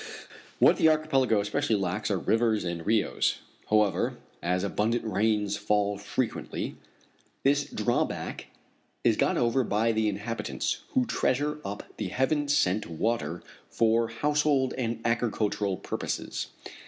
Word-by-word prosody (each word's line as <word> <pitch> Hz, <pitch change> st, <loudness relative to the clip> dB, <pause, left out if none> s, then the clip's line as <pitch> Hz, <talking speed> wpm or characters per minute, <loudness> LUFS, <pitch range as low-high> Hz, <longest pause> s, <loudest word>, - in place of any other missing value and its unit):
What -, -, +5 dB
the -, -, +5 dB
archipelago 135 Hz, -8 st, +2 dB
especially 115 Hz, +4 st, 0 dB
lacks 100 Hz, +1 st, -1 dB
are 100 Hz, -, +1 dB
rivers 110 Hz, +2 st, +1 dB
and 85 Hz, -2 st, -3 dB
rios. 110 Hz, 0 st, +2 dB, 0.3 s
However, 105 Hz, -2 st, +2 dB, 0.2 s
as 90 Hz, +2 st, 0 dB
abundant 110 Hz, +4 st, 0 dB
rains 105 Hz, 0 st, +1 dB
fall 105 Hz, -1 st, 0 dB
frequently, 110 Hz, +4 st, -3 dB, 0.7 s
this 145 Hz, +1 st, +3 dB
drawback 120 Hz, +3 st, -2 dB, 0.6 s
is -, -, +4 dB
got -, -, +1 dB
over 120 Hz, +2 st, +2 dB
by 110 Hz, +1 st, +1 dB
the 110 Hz, -1 st, +1 dB
inhabitants, 105 Hz, +3 st, -3 dB
who 260 Hz, -2 st, +3 dB
treasure 150 Hz, -, 0 dB
up 100 Hz, -3 st, -5 dB
the 105 Hz, -, -2 dB
heaven 145 Hz, +8 st, 0 dB
sent 105 Hz, -7 st, +2 dB
water 85 Hz, -2 st, -2 dB, 0.3 s
for 115 Hz, 0 st, +2 dB
household 145 Hz, +2 st, +1 dB
and 115 Hz, -3 st, -2 dB
agricultural 110 Hz, -4 st, 0 dB
purposes. -, -, -4 dB
110 Hz, 125 wpm, -28 LUFS, 100-130 Hz, 0.7 s, What